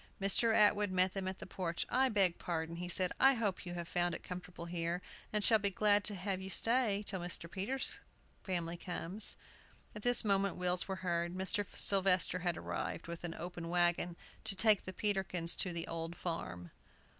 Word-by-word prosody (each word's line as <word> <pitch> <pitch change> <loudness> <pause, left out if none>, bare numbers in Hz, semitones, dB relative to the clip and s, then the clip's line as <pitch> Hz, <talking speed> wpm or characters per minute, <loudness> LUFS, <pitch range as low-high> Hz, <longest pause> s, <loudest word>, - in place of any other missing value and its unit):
Mr. 200 +4 +3
Atwood 210 -1 +4
met 185 0 +2
them 195 -1 -3
at 190 0 -3
the - - -8
porch. 175 -3 -3
"I 260 +1 +2
beg 195 -6 +2
pardon," 165 -1 -3
he 175 0 -5
said. 180 0 +1
"I 270 0 +6
hope 205 -6 -2
you 175 - -5
have 170 -1 -5
found 175 0 0
it - - -7
comfortable 180 -1 -7
here, 170 0 -2 0.3
and 210 -1 0
shall 220 -1 +6
be 200 0 0
glad 205 +1 +3
to 210 - +1
have 190 0 -3
you 190 - -6
stay 225 -1 +2
till 190 -2 -2
Mr. 175 -1 -4
Peters' 205 +10 -1 0.4
family 175 -2 -3
comes." 180 +3 +3 0.6
At 210 - -8
this 245 +1 +3
moment 200 -1 +2
wheels 180 0 +1
were 190 - -2
heard. 170 0 -1
Mr. 190 +2 -1
Sylvester 185 -2 +3
had 175 -2 -1
arrived, - - -4
with 170 0 -7
an 170 -1 -4
open 175 -1 -6
wagon, 175 0 +2 0.3
to 195 - 0
take 210 +1 +3
the 185 - -5
Peterkins 190 -5 0
to 180 - +2
the 170 -1 -3
"Old 165 0 -4
Farm." 90 - -5
185 Hz, 190 wpm, -35 LUFS, 175-205 Hz, 0.6 s, I